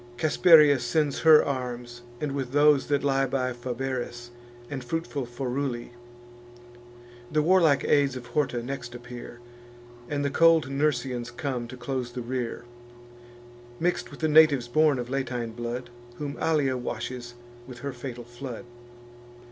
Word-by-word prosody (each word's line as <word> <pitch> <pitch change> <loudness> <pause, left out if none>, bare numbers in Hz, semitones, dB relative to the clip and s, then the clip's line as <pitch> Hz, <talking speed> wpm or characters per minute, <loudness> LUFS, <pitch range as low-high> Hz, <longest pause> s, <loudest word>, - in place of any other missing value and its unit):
Casperia 155 -2 +6
sends 140 +4 0
her 160 -2 +7
arms, 125 -3 -4 0.2
with 135 -3 -3
those 145 -1 +4
that 145 -1 +1
lie 135 -1 +2
By 130 -1 -1
Fabaris, 120 -1 -5 0.4
and 135 -2 -5
fruitful 145 -2 -3
Foruli: 125 0 -3 1.4
The 155 0 +2
warlike 165 -4 +4
aids 140 -3 +2
of 125 -1 -7
Horta 130 -4 -1
next 120 -2 -6
appear, 120 0 -9 0.7
And 145 -1 -1
the 140 - 0
cold 165 -2 +4
Nursians 130 -4 -1
come 125 -1 -4
to 130 +1 -10
close 125 -1 -4
the 125 -1 -5
rear, 120 -1 -4 1.1
Mix'd 175 +2 -1
with - - -12
the 160 - +2
natives 150 -5 +5
born 150 +2 +3
of 120 0 -5
Latine 125 -4 -2
blood, 120 +1 -5 0.2
Whom 145 +1 -5
Allia 145 -5 +1
washes 120 0 -5 0.3
with 125 -2 -10
her 140 -1 -4
fatal 120 -1 -7
flood. 120 0 -8
130 Hz, 135 wpm, -26 LUFS, 120-145 Hz, 1.4 s, her